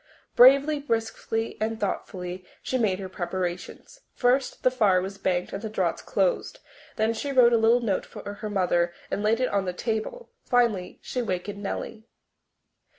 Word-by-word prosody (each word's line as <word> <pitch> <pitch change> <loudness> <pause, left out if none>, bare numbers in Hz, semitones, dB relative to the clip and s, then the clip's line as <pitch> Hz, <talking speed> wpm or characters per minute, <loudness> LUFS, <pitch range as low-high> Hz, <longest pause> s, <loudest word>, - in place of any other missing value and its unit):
Bravely, 275 +4 +6
briskly 225 -3 -2
and 220 0 -1
thoughtfully 185 -2 -4 0.2
she 260 - -1
made 200 -5 +1
her 190 -1 -6
preparations. 185 - -5
First, 250 +1 +1
the 255 - +4
fire 210 -7 +3
was 195 +2 -5
banked 180 -1 -1
and 195 - -4
the 220 - -4
draughts 185 -5 -1
dosed; 190 -3 -1 0.4
then 220 +1 +1
she 280 +5 -3
wrote 245 -3 +6
a - - +5
little 230 +2 +4
note 205 -5 -1
for 205 - -8
her 210 +1 -6
mother 175 -3 +1 0.2
and - - -1
laid 220 +2 +2
it 255 - +1
on 200 -1 0
the 180 - -2
table. 225 - -4
Finally 230 -8 +1
she 250 - -3
wakened 200 -1 -4
Nellie. 220 +2 -5
215 Hz, 165 wpm, -26 LUFS, 185-240 Hz, 0.4 s, Bravely